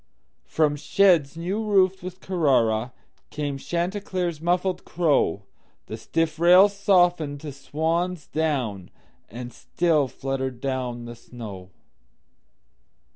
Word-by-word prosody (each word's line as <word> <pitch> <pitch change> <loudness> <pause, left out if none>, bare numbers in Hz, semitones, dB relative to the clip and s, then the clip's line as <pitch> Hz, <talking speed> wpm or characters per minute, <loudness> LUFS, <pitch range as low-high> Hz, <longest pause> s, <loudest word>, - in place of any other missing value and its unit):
From 150 -2 +1
sheds 165 -3 +3
new 190 +6 -2
roofed 190 -3 +2
with 185 +1 -8
CarraraCame 130 - -1
Chanticleer's 175 -1 -3
muffled 180 +2 0
crow, 145 - +1 0.4
The - - -6
stiff 155 +8 -2
rails 185 +4 +6
softened 175 -7 +2
to 155 -2 -6
swan's 160 +4 -2
down, 130 - -2 0.4
And 120 +2 -8
still 160 -5 +1
fluttered 130 -1 -4
down 125 -3 -3
the 120 0 -8
snow. 105 -6 -10
155 Hz, 100 wpm, -24 LUFS, 125-180 Hz, 0.4 s, rails